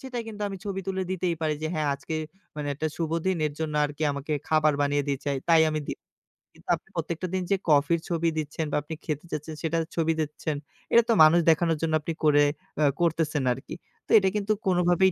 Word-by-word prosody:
সেটা 260 -2 -6
কিন্তু 210 -2 -6
আমি 195 - -5
ছবি 195 -2 -3
তুলে 190 0 -1
দিতেই 180 -2 0
পারি 155 -1 +1
যে, - - 0
"হ্যাঁ 155 -1 0
আজকে 140 +3 -6 0.4
মানে 150 -1 -3
একটা 155 +3 -2
শুভ 165 -2 -2 0.2
দিন 190 -2 +2
এর 150 - -4
জন্য 155 -1 -2
আরকি 145 +1 -4
আমাকে 140 +2 -4 0.2
খাবার 155 -1 +4
বানিয়ে 145 0 +1
দিয়েছে 140 0 -1
তাই 165 -1 +6
আমি 155 0 -1
দি - - -1 0.7
কিন্তু - - -18
আপনি - - -17
প্রত্যেকটা 170 +2 -3
দিন 185 - 0
যে - - +6
কফির 150 +3 +4
ছবি 170 -1 +1
দিচ্ছেন 155 +1 -2
বা - - +1
আপনি 150 +3 -7
খেতে 150 0 -3
যাচ্ছেন 155 +1 -4
সেটার 165 0 0
ছবি 165 -1 +2
দিচ্ছেন। 155 0 -2 0.4
এটা 235 - +7
তো - - +6
মানুষ 155 +2 +7
দেখানোর 165 0 +3
জন্য 165 -1 0
আপনি 165 +2 -3
করে 145 -1 +5 0.3
অ্যা 155 - +3 0.2
করতেছেন 160 -4 +1
আরকি। 130 - -8 0.3
তো - - -7
এটা 190 -1 +2
কিন্তু 210 0 +1
কোনভাবেই 180 0 +3
160 Hz, 210 wpm, -26 LUFS, 150-175 Hz, 0.7 s, এটা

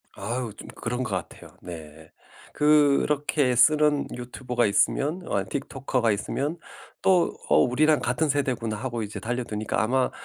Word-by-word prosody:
아유 120 -1 -3
좀 - - -10
그런 125 +2 -3
것 115 - -5
같아요. - - -8
네. 80 -2 -10 0.4
그렇게 145 -2 +3
쓰는 150 +2 +4
유튜버가 125 0 -2
있으면 145 - +1
어 100 -1 -1
틱토커가 130 -4 -1
있으면 140 - -2 0.4
또 185 -3 +3
"어 - - +3
우리랑 150 +5 +3
같은 125 +6 0
세대구나." 130 -6 -1
하고 120 0 -4
이제 105 0 -6
달려드니까 110 -4 -2
아마 125 +4 +1
125 Hz, 305 characters per minute, -25 LUFS, 115-145 Hz, 0.4 s, 쓰는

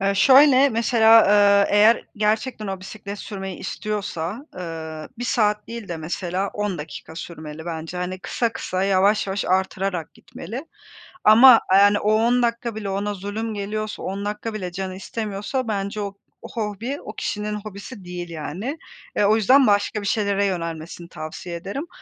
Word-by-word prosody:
E, 195 0 +1
şöyle, 270 +4 +7
mesela, 225 -1 +5
ııı, 200 0 +5
eğer 210 +3 +5
gerçekten 215 +2 0
o 190 -1 -4
bisiklet 200 +1 -8
sürmeyi 195 -3 -6
istiyorsa, 210 - -4
ııı, 160 -3 -6
1 245 - -3
saat 210 -3 +1
değil 230 -3 -7
de 170 - -3
mesela 180 +4 -3
10 205 -4 -2
dakika 160 +1 -9
sürmeli 160 -2 -8
bence. 165 +1 -5
Hani, 180 +1 -3
kısa 230 +4 -1
kısa, 185 -4 -3
yavaş 195 +2 +3
yavaş 195 0 -2
arttırarak 185 -2 -1
gitmeli. 235 - -8 0.6
Ama, 230 +2 +9
eee, - - +7
yani, 205 +1 +5
o 210 +1 +2
10 235 +3 +3
dakika 235 -1 -1
bile 210 -2 -4
ona 200 +2 -2
zulüm 205 +3 -4
geliyorsa, 215 +1 -4
10 195 +2 -4
dakika 210 +2 -4
bile 185 -4 -4
canı 185 +1 -5
istemiyorsa 210 +5 -4
bence 205 0 -2
o 200 -1 -5 0.3
o - - -8
hobi 230 +5 -4
o 210 - -8
kişinin 210 0 -3
hobisi 205 0 -9
değil, 175 -1 -6
yani. 170 - -5 0.4
Eee, 205 - +3
o 210 +2 +5
yüzden 255 +5 +5
başka 205 +1 +2
bir 200 - -4
şeylere 200 -2 +1
yönelmesini 170 -2 -4
tavsiye 165 +2 -7
ederim. 200 - -5
200 Hz, 165 wpm, -23 LUFS, 185-220 Hz, 0.6 s, Ama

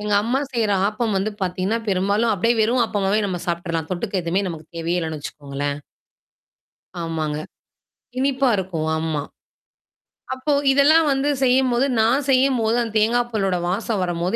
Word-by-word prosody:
எங்க 210 0 -2
அம்மா 245 +4 0
செய்ற 230 -4 0 0.2
ஆப்பம் 215 +2 -1
வந்து 195 +3 0
பாத்தீங்கன்னா, 185 +4 -1
பெரும்பாலும் 200 +4 +1
அப்படியியே 230 +4 +1
வெறும் 235 +3 +3
ஆப்பம்மாவே 205 -1 0
நம்ம 180 -3 -3
சாப்ப்டர்லாம். 170 -2 -2
தொட்டுக்கு 190 +1 -2
எதுவுமே 180 +4 0
நமக்கு 160 -2 -9
தேவையே 170 +2 -1
இல்லன்னு 160 -2 -4
வச்சுக்கோங்களேன். 145 0 -4 1.2
ஆமாங்க. 160 -2 -2 0.8
இனிப்பா 270 -1 +2
இருக்கும். 175 -4 -3
ஆமா. 160 -2 -2 1.1
அப்போ 260 +3 -2 0.2
இதெல்லாம் 300 +4 +5
வந்து 270 +2 +1
செய்யும்போது 255 0 +3 0.2
நான் 255 +5 +2
செய்யும்போது 255 -4 +3
அந்த 225 -2 -4
தேங்காய் 240 +3 +2
பலோட 195 -4 0
வாசம் 205 +1 -1
வரும்போது 175 +3 -1
205 Hz, 140 wpm, -22 LUFS, 170-240 Hz, 1.2 s, இதெல்லாம்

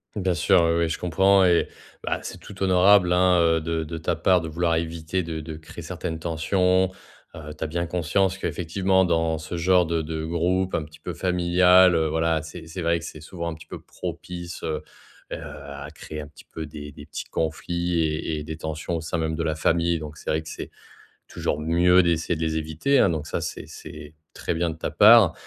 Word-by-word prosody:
Bien 95 -3 0
sûr, 90 +2 +4
oui, 85 0 +3
oui, 85 -1 +1
je 80 - -3
comprends 95 +3 +4
et 90 -2 +4 0.4
bah - - -1
c'est - - -7
tout 100 -1 -12
honorable 95 0 +5
hein, 90 0 +4
heu, 80 -1 +3
de 80 0 -2
de 80 +1 -6
ta 80 - -1
part 95 -3 +3
de 80 - -5
vouloir 85 +1 0
éviter 80 +2 -2
de 80 -1 -4
de 80 0 -7
créer 80 - -10
certaines 80 -1 -5
tensions. 90 +3 +1 0.4
Heu, 75 -1 -8
tu - - -4
as - - 0
bien 85 +2 -2
conscience 90 +3 0
qu'effectivement 95 +2 +1
dans 80 -2 +1
ce 80 +2 -5
genre 90 0 +3
de 80 -1 0
de 80 0 -4
groupe 90 +3 0
un 80 - -1
petit 75 +1 -14
peu - - -6
familial, 90 0 +5
heu, 80 -1 +1
voilà, 80 0 +1
c'est 80 0 -9
c'est 85 +2 -6
vrai 85 0 +2
que 85 - -8
c'est 80 -2 -9
souvent 85 +1 -5
un 80 - -5
petit 80 - -13
peu - - -9
propice, 85 -1 -7
heu 75 -1 -3 0.5
heu, - - -2
à 70 0 -8
créer 75 0 -8
un 75 - -8
petit 75 - -17
peu 80 -1 -7
des 75 0 -9
des 70 +1 -12
petits - - -6
conflits 85 +2 -2
et 80 0 -2
et 75 - -5
des 80 +1 -6
tensions 80 +2 -4
au - - -4
sein 85 +2 -3
même 80 -1 -1
de 80 - -2
la 80 -1 -1
famille, 85 +2 +1
donc 75 -1 -8
c'est - - -7
vrai 80 +1 0
que 80 - -9
c'est - - -7 0.6
toujours 75 - -2
mieux 90 +3 +4
d'essayer 85 0 +1
de 80 - -6
les 80 -1 0
éviter, 80 - +1
hein, - - +5
donc 80 -3 -2
ça, - - -3
c'est - - -5
c'est 75 0 -10 0.2
très - - -2
bien 85 +1 0
de 80 - -5
ta - - -3
part. 105 -4 +7
85 Hz, 225 wpm, -24 LUFS, 80-90 Hz, 0.6 s, part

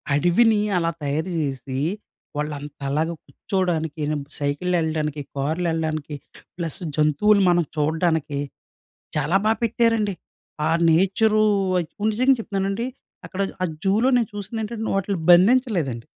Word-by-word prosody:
అడవిని 205 +8 +4 0.2
అలా 165 -1 +1
తయారు 155 +6 -1
చేసి 135 -2 -3 0.6
వాళ్ళు 150 0 -2
అంత 145 +1 -10 0.2
లాగా 160 +2 0
కూర్చోడానికి, 165 -5 -2 0.4
సైకిల్లెల్లడానికి, 155 0 -1 0.2
కార్లెల్లడానికి, 155 0 -1 0.4
ప్లస్ 165 -4 -4 0.2
జంతువులు 155 +8 +3
మనం 175 -1 +3
చూడ్డానికి 160 -1 0 0.8
చాలా 185 +5 +2
బాగా 220 +1 +3
పెట్టారండి. 225 -2 +2 0.5
ఆ - - +1 0.2
నేచరు 205 +6 +3 0.7
నిజంగా 255 +5 +3
చెప్తున్నానండి 200 +2 -2 0.4
అక్కడ 195 - -4 0.2
ఆ - - +3 0.2
జూలో 210 +6 +3
నేను 235 -4 0
చూసింది 205 +2 -5
ఏంటంటే 220 +1 -4
వాటిల్ని 195 -1 -1
బంధించలేదండి. 180 - +3
175 Hz, 105 wpm, -23 LUFS, 155-210 Hz, 0.8 s, అడవిని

